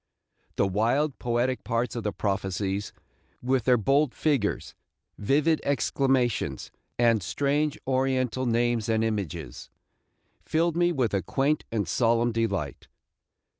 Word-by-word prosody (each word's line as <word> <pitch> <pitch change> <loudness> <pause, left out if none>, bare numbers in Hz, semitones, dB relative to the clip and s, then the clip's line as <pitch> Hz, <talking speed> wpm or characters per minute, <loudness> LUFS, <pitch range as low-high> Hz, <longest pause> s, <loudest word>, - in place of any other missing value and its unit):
The - - +2
wild, 120 +9 0
poetic 120 +1 0
parts 115 +1 -1
of 120 - -2
the 105 -1 -2
prophecies, 95 0 -2 0.5
with 130 -1 0
their 125 -1 +5
bold 135 +4 +2
figures, 140 -10 0 0.5
vivid 150 +8 +2
exclamations, 135 -4 0 0.3
and 115 -3 +3
strange 145 - 0
Oriental 130 -1 0
names 120 -1 +1
and 110 0 +2
images, 100 - -4 0.7
filled 165 +1 0
me 175 0 +3
with 130 -10 0
a 100 - +1
quaint 140 - 0
and 105 -5 -1
solemn 115 +4 +2
delight. 100 - -2
120 Hz, 120 wpm, -26 LUFS, 105-135 Hz, 0.7 s, their